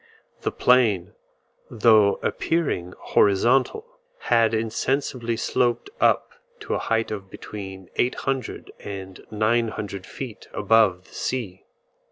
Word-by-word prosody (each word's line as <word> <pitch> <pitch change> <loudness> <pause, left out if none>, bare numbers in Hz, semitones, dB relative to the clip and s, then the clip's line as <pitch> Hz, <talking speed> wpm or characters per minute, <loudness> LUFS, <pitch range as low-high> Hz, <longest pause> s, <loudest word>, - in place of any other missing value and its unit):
The - - -1
plain, 110 -8 +3 0.6
though 110 -3 +5
appearing 115 - -1
horizontal, 120 - +2 0.4
had 115 -1 +3
insensibly 115 +1 -1
sloped 120 - 0
up - - +3 0.3
to 425 - -3
a - - 0
height 115 0 0
of 100 -3 -6
between 95 -3 -8
800 130 0 -2
and 95 -2 -8
900 110 -3 -1
feet 125 -6 -8
above 105 -4 +3
the - - -20
sea. 105 -8 -4
110 Hz, 105 wpm, -24 LUFS, 100-120 Hz, 0.6 s, though